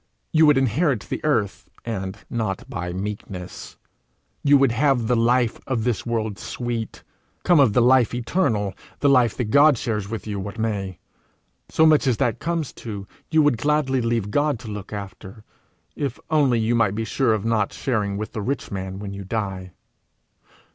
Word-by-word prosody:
You 155 0 +5
would 150 -2 +5
inherit 135 - +1
the - - -5
earth, 110 -10 0 0.2
and 95 -3 -4
not 110 -5 -3
by 90 0 -4
meekness; 95 -1 -6 0.7
you 145 0 +6
would 135 -3 +3
have 130 -1 +2
the 125 - +2
life 120 0 +2
of 125 -5 -1
this 120 -1 -1
world 110 -3 -2
sweet, 120 -2 -4 0.4
come 175 -3 +5
of 130 -7 +5
the 120 - +4
life 125 -1 +5
eternal, 115 - 0 0.3
the 145 - +4
life 125 -5 +4
that 115 -4 -2
God 145 -1 +6
shares 105 -3 -3
with 115 -1 -5
you, 105 -2 -4
what 100 +3 -6
may: 100 -5 -2 0.7
so 160 - +4
much 155 -3 +4
as 125 -4 +2
that 120 - 0
comes 165 -3 -2
to, 100 -4 -6 0.2
you 155 -1 +4
would 145 -6 +2
gladly 145 -2 +1
leave 115 -3 -1
God 145 +2 +1
to 115 - -8
look 105 -1 -7
after, 100 +1 -8 0.5
if 140 -4 -3
only 140 -6 +3
you 115 +1 +1
might 110 -4 +2
be 110 +1 -2
sure 115 0 +1
of 105 0 -4
not 110 -3 +1
sharing 105 -7 -1
with 110 +1 -5
the 110 - -3
rich 135 +7 -3
man 95 -1 -4
when 100 0 -6
you 100 0 -7
die. 95 -3 -4
115 Hz, 180 wpm, -23 LUFS, 105-135 Hz, 0.7 s, you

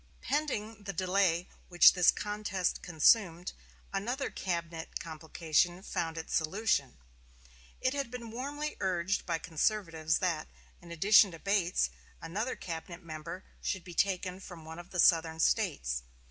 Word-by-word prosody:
Pending 225 -8 -2
the 195 - -3
delay 180 -1 +1 0.2
which 175 -1 +8
this 180 -1 +5
contest 205 -3 -1
consumed, 175 +1 +3 0.4
another 245 +8 -2
cabinet 170 -3 -4
complication 165 +2 0
found 165 -5 -3
its 160 - -5
solution. 160 - 0 0.8
It 260 - +1
had 280 -4 -2
been 235 -2 -7
warmly 290 +5 -4
urged 185 +1 0
by 170 -2 +1
conservatives 165 -1 0
that, 170 -4 -1 0.3
in 170 -1 -12
addition 200 +5 +6
to - - -8
Bates, 190 -1 +1 0.3
another 210 +10 -3
cabinet 170 +1 -7
member 160 +3 -7 0.2
should 190 -3 -2
be 175 0 -10
taken 185 0 0
from 175 -4 -10
one 160 +1 -8
of 175 +1 -11
the 180 - -4
Southern 160 -1 +4
States. - - +1
180 Hz, 135 wpm, -31 LUFS, 165-205 Hz, 0.8 s, which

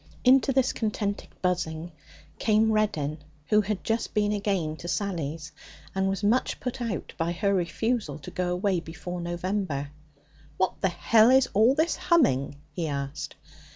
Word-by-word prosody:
Into 265 +1 +5
this 265 -1 +2
contented 210 -2 -2
buzzing 175 -2 -1 0.5
came 220 0 +3
Reddin, 160 -9 0 0.3
who 210 0 +5
had 210 -1 -3
just 225 +1 -1
been 210 -1 +2
again 195 -7 -1
to 170 - -8
Sally's, 165 -5 -3 0.4
and 190 0 +1
was 195 +1 -2
much 230 +5 +2
put 250 0 -4
out 230 -5 -3
by 165 +1 0
her 200 +3 +1
refusal 195 - -1
to 145 - -10
go 180 -1 -1
away 185 0 +1
before 175 +2 -6
November. 175 -4 -2 0.7
'What 190 - 0
the 195 - +3
h 220 +7 +5
is 265 - +2
all 225 +6 +5
this 315 +3 +1
humming?' 145 - +2 0.2
he 165 +2 -3
asked. 140 0 -4
195 Hz, 155 wpm, -27 LUFS, 165-215 Hz, 0.7 s, Into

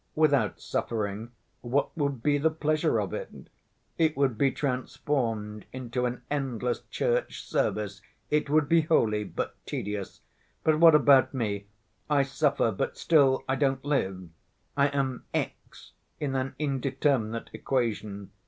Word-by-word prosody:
Without 140 - +2
suffering 110 0 -3 0.3
what 130 +4 0
would 140 -6 -1
be 145 -1 +3
the 160 +3 +3
pleasure 155 -1 +1
of - - -3
it? - - -4 0.7
It 160 -2 +2
would 135 -4 +2
be 135 +5 +3
transformed 125 -6 -2
into 125 -1 -2
an 125 0 -5
endless 125 -4 -1
church - - -1
service; 105 -2 -1 0.3
it 150 -1 +1
would 150 0 +3
be 165 +2 +5
holy, 115 -10 +2
but - - -4
tedious. 105 -1 -4 0.4
But 155 -1 +3
what 165 -2 +8
about 140 -3 +5
me? 100 -5 -2 0.4
I 145 -2 +4
suffer, 140 -3 +1
but 95 - -3
still, 140 -5 +4
I 130 - +1
don't 135 -1 0
live. 95 - -1 0.5
I 140 0 +4
am 135 -3 -2
x - - -5 0.3
in 140 -3 -2
an 130 0 -2
indeterminate 135 -5 0
equation. 105 -6 -2
135 Hz, 135 wpm, -28 LUFS, 115-145 Hz, 0.7 s, what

